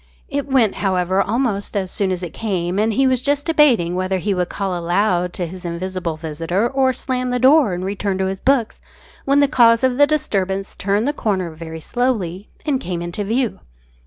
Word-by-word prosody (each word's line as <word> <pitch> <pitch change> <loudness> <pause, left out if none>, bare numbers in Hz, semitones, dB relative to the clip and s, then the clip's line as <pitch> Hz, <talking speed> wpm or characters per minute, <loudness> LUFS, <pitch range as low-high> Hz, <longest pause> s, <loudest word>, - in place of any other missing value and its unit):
It 285 0 -2
went, 255 -7 +3
however, 185 -1 +1
almost 210 -2 -1
as 190 -2 -2
soon 195 -2 -1
as 185 -1 -3
it 170 - -6
came, 185 -3 -2
and 220 +1 +2
he 270 +5 +2
was 255 -2 +2
just 285 +1 0
debating 265 - +3
whether 185 +1 -1
he 200 +3 -1
would 180 -1 -1
call 195 -3 -2
aloud 175 +1 +1
to 180 - -3
his 180 +2 -9
invisible 175 -1 -4
visitor, 165 +7 -1
or 265 0 +2
slam 255 0 -3
the 250 - 0
door 260 - +4
and 180 +1 -4
return 200 0 -2
to 190 - 0
his 190 0 -3
books, 260 -5 +1 0.4
when 280 +1 +4
the 285 - +5
cause 235 -4 +4
of 260 0 +1
the 290 - +7
disturbance 195 -10 -1
turned 205 +5 0
the 290 - +1
corner 190 - -1
very 160 0 -8
slowly 210 -5 -2 0.2
and 285 -4 +1
came 175 -5 -4
into 175 +4 -4
view. 230 +3 -1
200 Hz, 200 wpm, -20 LUFS, 180-255 Hz, 0.4 s, the